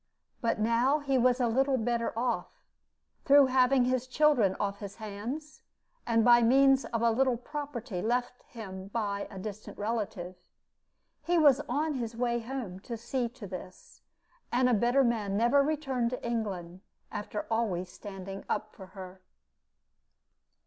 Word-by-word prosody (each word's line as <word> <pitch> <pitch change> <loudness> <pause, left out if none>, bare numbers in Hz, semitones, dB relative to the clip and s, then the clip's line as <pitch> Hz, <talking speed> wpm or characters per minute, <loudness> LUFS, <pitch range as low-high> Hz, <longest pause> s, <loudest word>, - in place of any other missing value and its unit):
But 230 -1 +1
now 235 +6 +2
he 275 -3 0
was 250 +1 +3
a 245 - +2
little 265 +3 +2
better 235 0 -1
off, 240 +1 -2 0.6
through 285 0 +7
having 255 0 +3
his 255 0 0
children 255 -8 +3
off 200 0 -2
his 200 -1 -7
hands, 230 +8 -6 0.5
and 230 -1 +3
by 240 0 +7
means 270 +3 +5
of 230 -1 -2
a 230 - +4
little 255 +1 +2
property 250 -7 -5
left 245 +3 -1
him 190 -5 -8
by 200 -1 -2
a 195 - -10
distant 210 +2 -7
relative. 205 -5 -3 0.9
He 350 0 +1
was 290 -5 +5
on 300 +5 0
his 235 -4 -4
way 240 -1 0
home 230 -6 -6
to 230 +4 -6
see 240 +1 -2
to 240 -2 -11
this; 185 -1 -10 0.5
and 250 +1 +3
a 250 - +3
better 240 +5 +3
man 215 -5 0
never 240 +6 +4
returned 275 -5 0
to 250 -1 -5
England, 190 -6 -3 0.3
after 210 0 -4
always 200 -6 0
standing 195 -1 -8
up 215 0 -2
for 190 - -11
her. 185 0 -9
235 Hz, 150 wpm, -30 LUFS, 205-260 Hz, 0.9 s, through